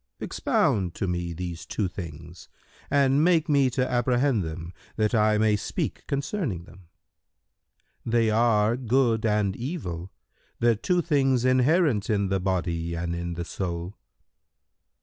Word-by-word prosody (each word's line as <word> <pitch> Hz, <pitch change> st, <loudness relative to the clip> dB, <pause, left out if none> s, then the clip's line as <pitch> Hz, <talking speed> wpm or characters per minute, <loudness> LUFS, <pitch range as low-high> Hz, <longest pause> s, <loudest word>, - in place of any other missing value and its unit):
"—"Expound 90 Hz, -5 st, 0 dB
to 95 Hz, -, -2 dB
me 85 Hz, -1 st, -2 dB
these 85 Hz, 0 st, -5 dB
two 105 Hz, -, -2 dB
things 85 Hz, -1 st, -9 dB, 0.4 s
and 140 Hz, +1 st, +3 dB
make 170 Hz, -1 st, +3 dB
me 140 Hz, -4 st, +3 dB
to 130 Hz, +1 st, 0 dB
apprehend 125 Hz, -1 st, +1 dB
them, 85 Hz, +2 st, -6 dB, 0.2 s
that 110 Hz, +1 st, 0 dB
I 105 Hz, -1 st, +3 dB
may 110 Hz, 0 st, +3 dB
speak 105 Hz, -, -4 dB
concerning 140 Hz, -, -2 dB
them." 90 Hz, 0 st, -17 dB, 1.2 s
Q 115 Hz, -, -3 dB
"They 115 Hz, -2 st, +3 dB
are 110 Hz, 0 st, +3 dB
good 120 Hz, -3 st, +1 dB
and 105 Hz, -2 st, +1 dB
evil, 95 Hz, -, -5 dB, 0.5 s
the 120 Hz, -1 st, +3 dB
two 175 Hz, -, 0 dB
things 135 Hz, -6 st, +2 dB
inherent 130 Hz, -, +3 dB
in 100 Hz, -3 st, +1 dB
the 95 Hz, 0 st, +1 dB
body 85 Hz, -3 st, -2 dB
and 85 Hz, 0 st, -3 dB
in 85 Hz, 0 st, -4 dB
the 85 Hz, 0 st, -4 dB
soul." 90 Hz, 0 st, -4 dB
105 Hz, 140 wpm, -26 LUFS, 90-130 Hz, 1.2 s, and